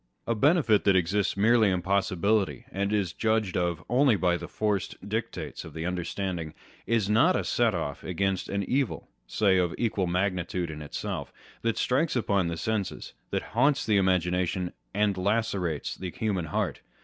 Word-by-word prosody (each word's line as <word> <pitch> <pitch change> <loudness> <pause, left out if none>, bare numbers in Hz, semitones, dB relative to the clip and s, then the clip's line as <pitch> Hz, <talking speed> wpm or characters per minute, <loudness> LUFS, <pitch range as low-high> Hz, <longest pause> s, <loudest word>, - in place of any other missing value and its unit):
A 115 - +1
benefit 125 - +3
that 100 -2 +5
exists 95 +3 +1
merely 110 +1 +4
in 90 -2 0
possibility, 95 - +1
and 100 +1 -1
is 100 -5 0
judged 110 -3 0
of 85 -2 -1
only 125 0 +4
by 90 -3 +2
the 85 0 -5
forced 100 -2 -2
dictates 110 +3 -4
of - - -11
the 80 +1 -4
understanding, 90 -2 -3 0.3
is 115 -4 +2
not 105 +2 +4
a - - 0
set - - +1
off - - -4
against 95 +1 -1
an 100 0 -1
evil 130 +5 -1 0.2
(say 95 - +3
of 90 -2 0
equal 105 -5 0
magnitude 90 -1 -1
in 75 0 -7
itself) 75 - -5 0.3
that 115 -1 0
strikes 145 +5 +1
upon 100 -6 +1
the 85 -1 -3
senses, 110 +1 -3 0.2
that - - -1
haunts 140 0 +3
the 105 -3 +3
imagination, 90 -1 +1 0.2
and 100 -1 +1
lacerates 95 -5 -1
the 95 - -6
human 95 -2 -2
heart. 75 - -2
100 Hz, 165 wpm, -28 LUFS, 90-110 Hz, 0.3 s, that